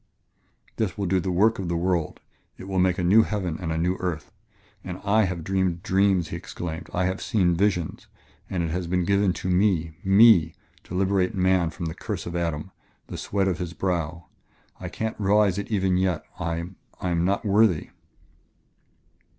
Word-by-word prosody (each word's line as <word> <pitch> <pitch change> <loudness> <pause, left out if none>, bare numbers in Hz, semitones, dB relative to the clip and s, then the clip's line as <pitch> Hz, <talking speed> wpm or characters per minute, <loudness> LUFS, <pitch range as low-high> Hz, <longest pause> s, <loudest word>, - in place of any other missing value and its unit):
"This 100 -5 -1
will 100 - -1
do 95 +1 +2
the 95 - -3
work 105 +5 +3
of 95 - -3
the 85 0 -1
world: 85 -2 -1 0.4
it - - -10
will 95 -1 -1
make 90 -1 +2
a 90 - -1
new 100 +6 +6
heaven 95 -7 -2
and 80 -2 -3
a 80 - -1
new 90 +3 0
earth! 85 -4 -4 0.5
Oh, 90 0 -6
I 105 +1 +4
have 90 -3 -4
dreamed 95 -1 -1
dreams," 95 -4 +2
he - - -5
exclaimed, 85 -1 -6
"I 90 +1 0
have 95 +1 -2
seen 95 -6 +2
visions. 90 -3 -1 0.4
And 90 -2 -1
it 80 - -2
has 90 +1 -3
been 90 0 0
given 100 0 +2
to - - -5
me 90 -4 +1
me! 95 -4 +6 0.3
to 90 - -7
liberate 95 -1 +1
man 95 -2 +2
from 85 +2 -6
the 80 - -3
curse - - -5
of 85 - -5
Adam... 85 0 -2 0.4
the - - -6
sweat 100 -1 -1
of 90 -3 -1
his 90 -2 -4
brow.... 85 -3 -2 0.5
I - - -6
can't 110 0 -4
realize 100 -1 +3
it 100 - -6
even 95 -4 +1
yet. 90 -3 0 0.2
I 85 +1 -3 0.3
I 90 - -2
am 85 0 +1
not 100 +4 0
worthy...." 100 -4 +3
90 Hz, 190 wpm, -25 LUFS, 85-95 Hz, 0.5 s, new